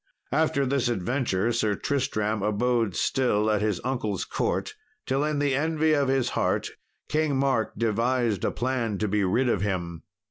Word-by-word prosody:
After 150 -1 +2
this 135 -1 +1
adventure 120 -1 0
Sir 110 -3 +1
Tristram 110 -7 -1
abode 110 0 +1
still 110 -3 +1
at 105 -1 +1
his 105 -4 0
uncle's 110 -7 -2
court, - - -2 0.3
till 135 +2 0
in 150 0 0
the 145 -1 +1
envy 155 +2 +1
of 140 -2 +2
his 130 -2 +1
heart - - 0 0.4
King 155 -3 +1
Mark 130 -5 +1
devised 115 -1 0
a - - +2
plan 120 -4 -1
to 105 - -1
be 105 0 +1
rid 115 +8 +2
of 105 -6 +1
him. 85 -4 -2
120 Hz, 165 wpm, -26 LUFS, 105-135 Hz, 0.4 s, After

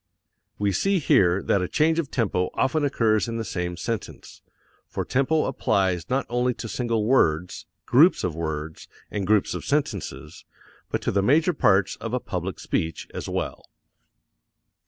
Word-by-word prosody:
We 100 -1 +1
see 195 - +1
here 95 - +3
that 100 - +2
a 90 - -1
change 160 - +2
of 150 -5 -2
tempo 95 -7 0
often 150 +3 +1
occurs 115 -6 +2
in 115 0 -3
the 115 - -3
same 90 -2 -3
sentence 115 +3 -6 0.5
for - - -4
tempo 145 +4 +1
applies 95 -8 0
not 130 +1 0
only 125 0 0
to 115 - -6
single 115 -2 -1
words, 90 -9 +1 0.2
groups 155 +9 +5
of 90 - -1
words, 80 -1 -5 0.2
and 100 -3 -3
groups 105 -1 +2
of - - -5
sentences, 140 - -3 0.5
but - - -2
to - - 0
the 100 - +2
major 155 - +3
parts 100 -9 +2
of 115 +2 -4
a - - 0
public 90 -5 -5
speech 80 -1 -3
as - - -5
well. - - -3
110 Hz, 160 wpm, -24 LUFS, 90-130 Hz, 0.5 s, groups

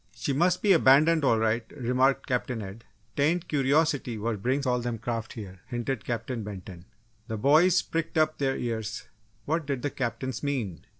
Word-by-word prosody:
"She 140 - -2
must 175 +5 +2
be 200 -2 +6
abandoned, 155 +1 +5
all 115 -4 +4
right!" 110 +1 +1
remarked 130 +2 +1
Captain 125 -1 -2
Ed. 100 +4 -10 0.3
"'Tain't 165 +5 +1
curiosity 140 -3 +1
what 110 -1 -3
brings 135 +5 0
all 125 -1 +1
them 120 -1 -3
craft 115 -1 -4
here," 95 -5 -9
hinted 120 -1 -3
Captain 120 0 -3
Benton. 95 -3 -9 0.4
The 110 - -3
boys 155 - +4
pricked 165 0 -3
up 155 0 +2
their 135 -1 0
ears. 110 -2 -3 0.4
What 160 0 -1
did 135 -4 -2
the 145 - -1
Captains 120 -1 -3
mean? 120 - -3
125 Hz, 170 wpm, -27 LUFS, 115-145 Hz, 0.4 s, be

